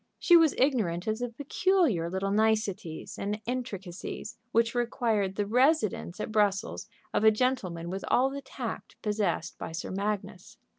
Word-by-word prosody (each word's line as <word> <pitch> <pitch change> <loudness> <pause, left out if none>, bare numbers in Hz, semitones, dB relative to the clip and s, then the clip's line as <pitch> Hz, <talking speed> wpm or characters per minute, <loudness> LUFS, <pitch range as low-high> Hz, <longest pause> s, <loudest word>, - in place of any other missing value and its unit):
She 345 - +5
was 325 -3 +6
ignorant 215 -11 +1
of 220 +1 -1
the 245 0 -2
peculiar 285 - +1
little 190 +2 -1
niceties 210 -6 0
and 205 +2 -2
intricacies 210 -6 -5 0.2
which 230 0 +2
required 230 -5 0
the 205 - 0
residence 240 - +2
at 215 - -3
Brussels 205 -1 +1 0.3
of - - +1
a 220 - +9
gentleman 210 -8 -1
with 190 +1 -4
all 265 +2 +3
the 280 0 -5
tact 255 -3 -6
possessed 205 -6 -1
by - - -6
Sir 165 - -4
Magnus. 195 -2 -4
215 Hz, 150 wpm, -29 LUFS, 190-250 Hz, 0.3 s, a